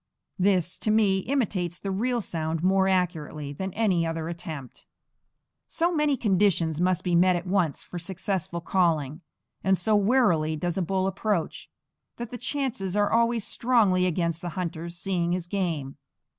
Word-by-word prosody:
This, 185 -2 +2
to - - -1
me, 210 -3 +3
imitates 190 - -1
the 195 - -4
real 235 +5 0
sound 160 -3 -3
more 190 +1 +3
accurately 160 -6 -1
than 190 +6 -4
any 195 -7 +2
other 165 -1 -3
attempt. 160 -6 -8 0.8
So 345 +1 0
many 300 -3 +2
conditions 185 -7 +2
must 180 -1 +1
be 180 - -1
met 180 +1 +5
at 175 +1 -3
once 180 -6 0
for 175 - -7
successful 180 -1 -3
calling, 165 -4 0 0.4
and 190 0 +3
so 215 +4 +2
warily 195 -8 +3
does 170 +2 -2
a - - 0
bull 190 +2 0
approach, 195 -2 -2 0.5
that 235 -1 -6
the 245 - -6
chances 245 -8 -2
are 205 0 +2
always 230 -1 +2
strongly 210 -7 +2
against 170 -1 -1
the 175 - -4
hunter's 170 -1 -4
seeing 175 -2 -1
his 180 -1 -2
game. 170 -8 -3
185 Hz, 160 wpm, -26 LUFS, 170-205 Hz, 0.8 s, met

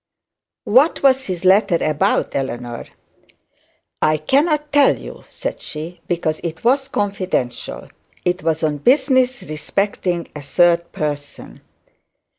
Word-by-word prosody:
'What 265 +10 +3
was 265 -1 +3
the 185 - -1
letter 195 -2 +4
about, 155 -1 0
Eleanor?' 120 -3 -4 1.1
'I 155 0 +3
cannot 295 - +1
tell 285 -1 +5
you,' - - -11
said - - -5
she, 160 +3 -7
'because 160 -3 -1
it 165 -1 -5
was 270 +3 +2
confidential. 195 - -3 0.4
It 180 +1 0
was 160 0 -1
on 150 -2 0
business 260 - +2
respecting 175 +2 -2
a 150 - -6
third 170 +3 +2
person.' 145 -1 -5
175 Hz, 115 wpm, -19 LUFS, 155-255 Hz, 1.1 s, tell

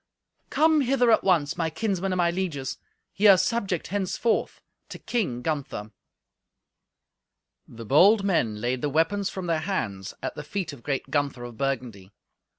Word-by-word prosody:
"Come 315 -1 +3
hither 250 -2 +3
at - - +4
once, 165 -5 +2
my 165 -2 0
kinsmen 195 +2 -2
and 185 - -1
my 170 -1 +2
lieges. 165 -8 -3 0.3
Ye 210 +2 +3
are 195 -2 +8
subject 190 -3 -1
henceforth 205 +4 -1 0.3
to - - -7
King 135 - -2
Gunther." 140 -9 -3 1.8
The 115 0 -10
bold 195 - +5
men 125 - 0
laid 125 +3 -1
the 145 - 0
weapons 165 +7 +1
from 190 -2 -6
their 165 -2 0
hands 110 - -3
at - - -3
the - - -7
feet 175 +1 -4
of 135 - -12
great 135 +1 -3
Gunther 140 -4 -1
of 120 -1 -8
Burgundy. 120 -8 -3
165 Hz, 155 wpm, -26 LUFS, 130-195 Hz, 1.8 s, are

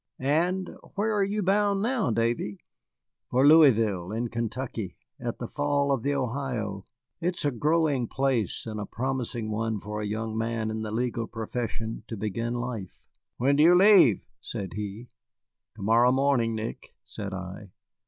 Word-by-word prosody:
And 175 +7 0 0.2
where 215 +2 +1
are 205 -1 +2
you 205 +1 -1
bound 200 +1 +2
now, 240 - +1
Davy?" 115 -2 0 0.7
"For 130 +2 +3
Louisville, 115 - +5
in 115 +2 -2
Kentucky, 115 -3 -4 0.2
at 120 -1 -4
the 120 - -5
Falls 145 0 +1
of 135 - -1
the 140 +3 0
Ohio. 120 -7 -3 0.3
It 175 +1 -1
is - - -2
a 145 - +2
growing 145 -1 +1
place, 130 -7 0
and 110 -2 -5
a 105 - -4
promising 120 -3 -3
one 110 0 -1
for 105 +1 -5
a 105 - -2
young 110 +1 -3
man 115 -1 -1
in 110 0 -3
the 110 - -4
legal 115 +1 -1
profession 115 0 -4
to 115 - -5
begin 115 +4 -2
life." 120 -6 -5 0.3
"When 135 +3 +3
do - - +5
you 170 +3 +7
leave?" 185 - +6
said 95 -3 -6
he. 105 +4 -6 0.7
"To 105 - -8
morrow 115 +4 +5
morning, 130 -4 +2
Nick," 110 +1 -6
said 100 -1 -6
I. 95 +2 -7
120 Hz, 165 wpm, -27 LUFS, 110-140 Hz, 0.7 s, you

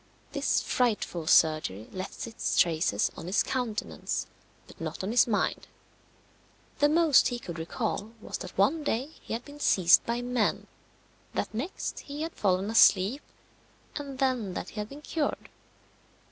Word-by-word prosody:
This - - +1
frightful 210 -9 0
surgery 155 - +3
left 185 0 -6
its 230 -1 -3
traces 160 - +2
on - - -8
his 185 - +2
countenance, 245 -5 -3 0.4
but - - -16
not - - -4
on 195 - -2
his 240 0 +5
mind. 215 -3 0 1.1
The 290 - +5
most 320 -3 +5
he 245 - -2
could 170 -8 -7
recall 210 +5 -3
was - - -6
that 180 - -9
one 285 +12 +3
day 270 +2 -1
he - - -6
had 235 +2 -4
been 290 0 -12
seized 180 -10 +5
by 235 +1 -1
men, 245 -3 0 0.7
that - - -2
next 265 - -4
he 290 +2 -6
had 325 - -4
fallen 195 +1 0
asleep, 220 +4 +5 0.7
and 280 -2 -6
then 250 -8 0
that - - -4
he 215 - -8
had 210 0 -4
been 290 +2 -11
cured. 305 -2 -2
225 Hz, 155 wpm, -28 LUFS, 185-270 Hz, 1.1 s, his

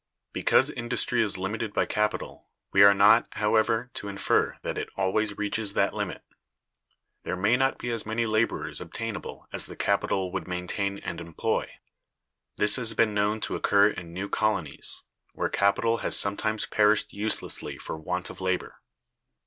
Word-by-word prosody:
Because - - +3
industry 120 0 -1
is 105 -4 +2
limited 105 +3 -3
by - - +2
capital, 105 0 -2 0.2
we 100 - +5
are 100 0 +8
not, 105 +4 +6
however, 110 +3 +1
to 100 - -5
infer 100 0 0
that - - -3
it - - -4
always 100 +2 0
reaches 105 0 -1
that - - +1
limit. - - -4 1.0
There - - -3
may 100 +6 +3
not 135 +1 +1
be 120 - -4
as 115 -2 -1
many 110 +2 -1
laborers 110 +1 0
obtainable 115 -1 -6
as - - 0
the - - -9
capital 95 -2 0
would 95 0 -4
maintain 90 +2 -2
and 85 - -6
employ. 85 -1 -2 0.9
This 105 +2 +4
has 115 -3 0
been 110 -2 +3
known 105 +1 0
to - - -2
occur 100 +1 +4
in 85 -4 -8
new 95 +4 -4
colonies, 100 -9 -1 0.3
where - - -1
capital 115 +3 +2
has - - +1
sometimes 110 +2 0
perished 105 0 +2
uselessly 105 +2 -1
for - - -6
want 90 +4 -4
of 95 - -12
labor. 95 0 -2
105 Hz, 160 wpm, -27 LUFS, 95-110 Hz, 1.0 s, are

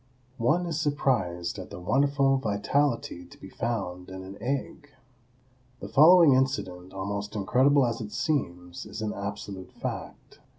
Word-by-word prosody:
One 155 +10 +2
is 160 -2 -2
surprised 125 - 0
at - - -8
the - - -8
wonderful 135 +6 +2
vitality 115 -2 0
to 85 - -16
be 95 - -11
found 95 -6 -3
in 95 0 -7
an 95 +1 -9
egg. 140 +3 -3 0.9
The 100 - -7
following 155 - +7
incident, 95 -9 -1
almost 100 +2 -4
incredible 130 +7 +3
as 115 -1 -2
it 105 -1 -6
seems, 90 - -2
is 105 +1 -6
an 105 - -2
absolute 100 -2 -6
fact. - - -7
110 Hz, 140 wpm, -27 LUFS, 95-140 Hz, 0.9 s, following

